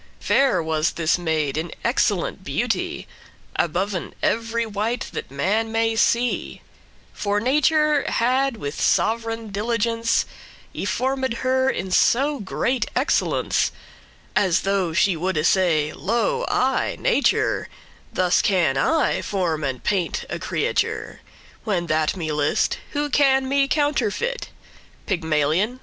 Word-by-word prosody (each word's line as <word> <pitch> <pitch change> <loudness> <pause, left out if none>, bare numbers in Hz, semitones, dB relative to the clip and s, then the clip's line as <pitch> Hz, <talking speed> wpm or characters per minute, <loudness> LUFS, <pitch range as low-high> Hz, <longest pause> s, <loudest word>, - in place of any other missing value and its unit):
Fair 270 -10 +2
was 160 +1 0
this 165 +1 +1
maid 155 -4 -1
in 165 0 -4
excellent - - 0
beauty - - -2 0.5
Aboven 180 +3 -1
ev'ry 230 +1 0
wight 220 +3 -2
that - - -5
man 205 - 0
may 225 0 +1
see: 235 +2 0 0.5
For 205 0 -1
nature 300 +4 +2
had 255 +1 +1
with 145 -7 -5
sov'reign 225 -1 0
diligence 230 +2 0 0.5
Y - - -4
formed 260 0 -1
her 260 +1 +2
in 190 -7 -3
so 275 +9 +3
great 235 +4 -1
excellence, 260 +4 +1 0.6
As 185 -4 +3
though 195 -3 0
she 185 +2 +2
woulde 165 -2 -1
say, 165 -5 +2
"Lo, 465 - 0
I, - - +1
Nature, - - +1 0.4
Thus 180 -1 +2
can 175 -9 +2
I 320 - +2
form 170 -6 -1
and 135 -3 -3
paint 190 -4 -1
a - - -3
creature, - - -2 0.4
When 190 -6 -1
that 155 0 +1
me 160 -4 -3
list; 150 -1 0
who 295 0 0
can 270 -2 +3
me 275 +1 +2
counterfeit? 295 - 0 0.6
Pygmalion? 165 - 0
210 Hz, 120 wpm, -22 LUFS, 170-255 Hz, 0.6 s, so